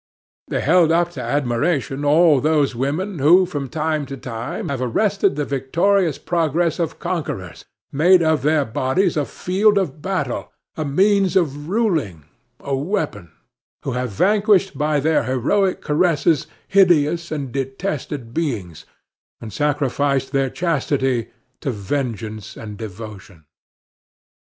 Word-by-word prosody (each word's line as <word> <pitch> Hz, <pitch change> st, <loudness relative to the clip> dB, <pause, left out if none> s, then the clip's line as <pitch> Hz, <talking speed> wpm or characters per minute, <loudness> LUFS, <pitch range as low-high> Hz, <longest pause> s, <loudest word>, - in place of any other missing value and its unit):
They -, -, -2 dB
held 170 Hz, -3 st, +4 dB
up 170 Hz, +1 st, +2 dB
to 140 Hz, -7 st, -7 dB
admiration 135 Hz, +2 st, -1 dB
all 150 Hz, -1 st, +5 dB
those 150 Hz, -3 st, +2 dB
women 155 Hz, -, -2 dB
who 175 Hz, +7 st, +6 dB
from 145 Hz, -6 st, -5 dB
time 155 Hz, 0 st, -1 dB
to 135 Hz, -, -7 dB
time 115 Hz, -2 st, -5 dB
have 135 Hz, -2 st, -3 dB
arrested 190 Hz, -, +1 dB
the 145 Hz, 0 st, -1 dB
victorious 165 Hz, +5 st, +1 dB
progress 165 Hz, 0 st, 0 dB
of 165 Hz, -2 st, -2 dB
conquerors, 100 Hz, -, -4 dB, 0.3 s
made 170 Hz, +5 st, +5 dB
of 160 Hz, -3 st, +2 dB
their 150 Hz, 0 st, +2 dB
bodies 135 Hz, -, 0 dB
a 150 Hz, -2 st, 0 dB
field 205 Hz, +7 st, +1 dB
of 155 Hz, -6 st, -1 dB
battle, 190 Hz, +1 st, -3 dB, 0.2 s
a 155 Hz, -, -2 dB
means 190 Hz, +5 st, +2 dB
of 145 Hz, -4 st, 0 dB
ruling, 160 Hz, -, 0 dB, 0.4 s
a 140 Hz, -, -2 dB
weapon; 140 Hz, -, -3 dB, 0.5 s
who 135 Hz, -, -2 dB
have 125 Hz, 0 st, -2 dB
vanquished 200 Hz, -, +2 dB
by 150 Hz, 0 st, +1 dB
their 155 Hz, -2 st, +1 dB
heroic 160 Hz, -, +1 dB
caresses 160 Hz, -1 st, +1 dB, 0.2 s
hideous 170 Hz, -3 st, +3 dB
or 155 Hz, -, -1 dB
detested 135 Hz, -1 st, -4 dB
beings, 110 Hz, -, -3 dB, 0.5 s
and 110 Hz, -3 st, -9 dB
sacrificed 140 Hz, -1 st, 0 dB
their 135 Hz, -1 st, +1 dB
chastity 135 Hz, -7 st, 0 dB, 0.3 s
to 145 Hz, -, -3 dB
vengeance 110 Hz, -2 st, -4 dB
and 105 Hz, -2 st, -8 dB
devotion. 100 Hz, -5 st, -9 dB
145 Hz, 130 wpm, -20 LUFS, 130-175 Hz, 0.5 s, who